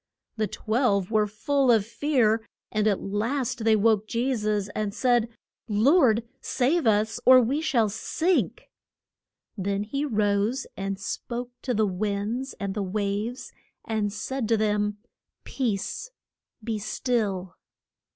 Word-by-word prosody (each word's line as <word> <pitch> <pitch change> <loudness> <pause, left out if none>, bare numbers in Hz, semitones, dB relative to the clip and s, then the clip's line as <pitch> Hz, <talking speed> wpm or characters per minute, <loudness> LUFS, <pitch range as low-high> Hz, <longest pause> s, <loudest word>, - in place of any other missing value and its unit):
The 215 -2 0
twelve 215 -2 0
were 215 -1 +3
full 260 +5 +1
of 220 -4 +3
fear; 230 -3 +1 0.3
and 215 0 +1
at 200 -3 +1
last 230 +4 -1
they 220 -1 +5
woke 215 0 +2
Je 250 +4 0
sus, 210 -2 -1
and 205 0 -3
said, 240 -3 +2 0.4
Lord, 235 - +4
save 280 +3 +1
us, 220 +2 +2
or 255 0 +8
we 260 +5 +1
shall 245 -9 +2
sink. 330 - -1 0.8
Then 200 0 -1
he 275 +7 -3
rose 215 0 +1
and 195 0 -3
spoke 240 +4 -5
to 250 -3 -1
the 215 0 +3
winds 205 +6 -2
and 200 -2 -2
the 210 - -2
waves, 205 +5 -3 0.3
and 215 -2 -1
said 230 +4 -3
to 225 0 +3
them, 210 -1 0 0.5
Peace, 240 - -2 0.5
be 220 -1 -2
still. 200 -5 -1
220 Hz, 130 wpm, -26 LUFS, 205-245 Hz, 0.8 s, or